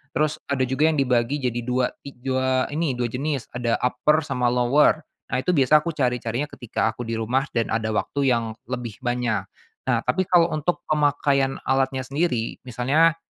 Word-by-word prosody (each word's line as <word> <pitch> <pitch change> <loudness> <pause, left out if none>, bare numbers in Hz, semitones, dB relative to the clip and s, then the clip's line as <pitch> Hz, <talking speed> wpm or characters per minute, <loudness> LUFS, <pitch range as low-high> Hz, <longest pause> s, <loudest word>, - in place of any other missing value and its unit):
Terus 155 0 +1
ada 135 -2 +1
juga 140 +5 +2
yang 155 - 0
dibagi 125 +1 +2
jadi 120 -1 0
2 125 +1 0
ik 130 -3 -12
2 130 -1 +1
ini 150 -5 0
2 120 - 0
jenis. 140 0 -2
Ada 120 -2 0
upper 150 +5 +2
sama 125 -4 0
lower. 130 +6 +3 0.3
Nah, 125 - 0
itu 180 - +2
biasa 150 0 +4
aku 170 - -1
cari-carinya 125 0 -1
ketika 120 -4 -2
aku 120 +2 -7
di 115 0 -4
rumah 125 +5 +1
dan 115 -1 0
ada 110 -1 -1
waktu 135 +4 0
yang 115 -2 -1 0.2
lebih 120 -4 -4
banyak. 120 -5 0 0.4
Nah, - - +3
tapi 185 +2 +1
kalau 170 -2 +4
untuk 155 +3 -1
pemakaian 145 -2 +2
alatnya 135 0 +1
sendiri, 135 -4 -1
misalnya, 145 +8 +3
130 Hz, 175 wpm, -24 LUFS, 120-150 Hz, 0.4 s, biasa